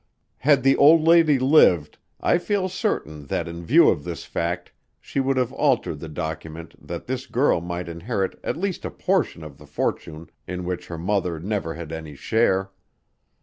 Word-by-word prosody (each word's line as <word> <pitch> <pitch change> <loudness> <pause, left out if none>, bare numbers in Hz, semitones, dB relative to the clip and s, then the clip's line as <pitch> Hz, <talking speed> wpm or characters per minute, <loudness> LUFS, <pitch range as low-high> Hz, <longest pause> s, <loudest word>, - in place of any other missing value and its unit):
Had 140 -2 +3
the 135 0 +5
old 155 +3 +7
lady 165 -3 +5
lived, 125 - +4 0.2
I 175 - +2
feel 195 +1 -1
certain 80 - -3
that 85 - -2
in 85 0 -7
view 80 - +5
of - - 0
this - - -6
fact 85 +1 -3 0.3
she - - -4
would 135 0 +1
have 125 0 0
altered 130 - +1
the 80 - -8
document 80 +1 -6
that - - -6
this - - -4
girl - - +2
might 85 0 -5
inherit 95 +4 -3
at - - -2
least 190 0 -3
a - - -3
portion 180 - -1
of 75 -3 -11
the - - -15
fortune 80 +1 -4 0.2
in 90 0 -5
which 90 0 -4
her 85 - -6
mother 90 -2 -1
never 95 -2 -3
had 85 -1 -8
any 80 -2 -7
share. 95 +2 +1
90 Hz, 180 wpm, -23 LUFS, 80-135 Hz, 0.3 s, old